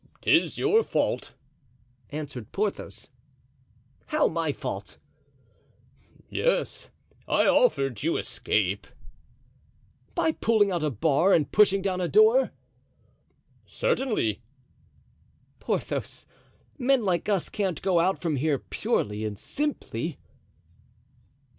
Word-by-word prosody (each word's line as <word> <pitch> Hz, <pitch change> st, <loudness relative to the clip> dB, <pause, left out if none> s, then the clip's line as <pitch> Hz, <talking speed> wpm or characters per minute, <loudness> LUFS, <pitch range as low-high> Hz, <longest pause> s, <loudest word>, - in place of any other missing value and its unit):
"'Tis -, -, +3 dB
your 420 Hz, +2 st, +3 dB
fault," -, -, -2 dB, 0.7 s
answered 145 Hz, -7 st, -7 dB
Porthos. 205 Hz, 0 st, -4 dB, 1.0 s
"How, -, -, +2 dB
my -, -, -1 dB
fault?" -, -, -6 dB, 1.3 s
"Yes, -, -, -1 dB, 0.4 s
I -, -, +3 dB
offered 135 Hz, -, +2 dB
you 165 Hz, +3 st, 0 dB
escape." -, -, -1 dB, 1.3 s
"By 320 Hz, -, +2 dB
pulling 220 Hz, -8 st, +2 dB
out 175 Hz, -3 st, -1 dB
a 155 Hz, -, +1 dB
bar 155 Hz, -, +2 dB
and 150 Hz, -4 st, +2 dB
pushing 200 Hz, -2 st, +4 dB
down 185 Hz, -2 st, -1 dB
a 175 Hz, -, 0 dB
door?" 440 Hz, +4 st, +5 dB, 1.2 s
"Certainly." 265 Hz, -, -1 dB, 1.2 s
"Porthos, -, -, -3 dB, 0.5 s
men 255 Hz, -3 st, +2 dB
like 185 Hz, +2 st, 0 dB
us 195 Hz, -4 st, +1 dB
can't 190 Hz, -6 st, -2 dB
go 185 Hz, -3 st, +3 dB
out 185 Hz, +3 st, +2 dB
from 160 Hz, -5 st, -1 dB
here 145 Hz, +1 st, +1 dB
purely 105 Hz, -4 st, -2 dB
and 105 Hz, -2 st, -4 dB
simply." 295 Hz, -, -3 dB
185 Hz, 100 wpm, -26 LUFS, 150-245 Hz, 1.3 s, door